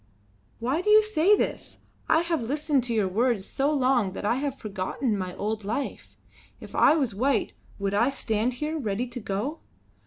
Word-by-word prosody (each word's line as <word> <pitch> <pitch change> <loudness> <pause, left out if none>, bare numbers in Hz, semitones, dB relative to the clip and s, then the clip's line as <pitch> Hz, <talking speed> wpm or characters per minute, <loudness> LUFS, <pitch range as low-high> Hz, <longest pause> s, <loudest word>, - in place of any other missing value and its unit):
"Why 260 +8 -1
do 420 - -1
you 430 +1 +7
say 415 -1 +4
this? - - -3 0.3
I 320 - +5
have 335 -4 -1
listened 285 +2 0
to 240 - -1
your 210 -3 +2
words 220 +1 +1
so 275 +6 0
long 255 -8 +2
that 205 - -5
I 235 +4 +2
have 275 -1 -2
forgotten 210 +3 -2
my 185 -2 -4
old 215 +2 -3
life. 230 +8 -4 0.4
If - - -11
I - - +5
was 265 -8 0
white 265 +7 0 0.2
would 200 0 -2
I 230 +6 +3
stand 230 -2 -1
here, 305 +5 -3
ready 220 -1 -1
to 245 0 -7
go? 215 +9 -3
250 Hz, 185 wpm, -26 LUFS, 210-290 Hz, 0.4 s, you